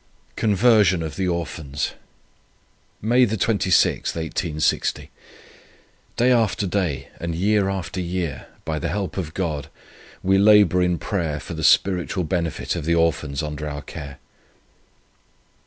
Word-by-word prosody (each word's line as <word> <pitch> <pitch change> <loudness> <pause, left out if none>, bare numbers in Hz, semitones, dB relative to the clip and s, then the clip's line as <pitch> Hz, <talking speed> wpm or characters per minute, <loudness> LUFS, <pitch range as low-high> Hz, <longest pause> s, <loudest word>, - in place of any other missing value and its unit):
CONVERSION 105 -4 +3
OF 80 - -5
THE 95 -1 -1
ORPHANS. 80 -5 -3 1.1
"May 120 +4 +4
26, 100 -3 +2
1860. 80 -1 -1 1.1
Day 125 +2 +4
after 110 -4 +2
day, 90 -7 -2
and 85 -1 -3
year 100 +2 +2
after 95 -1 -4
year, 85 -6 -3 0.2
by 80 -1 -2
the - - -2
help 100 -3 -3
of 85 -5 -4
God, 80 -7 -2 0.6
we 95 +1 +3
labour 100 -3 +6
in 90 -1 +1
prayer 80 -5 -2
for 90 - -8
the 80 -1 -5
spiritual 90 +2 +3
benefit 85 0 -2
of 85 -4 -4
the 85 +1 +2
Orphans 80 -3 0
under 75 0 -4
our 75 0 -6
care. 70 -3 -8
90 Hz, 125 wpm, -22 LUFS, 80-100 Hz, 1.1 s, labour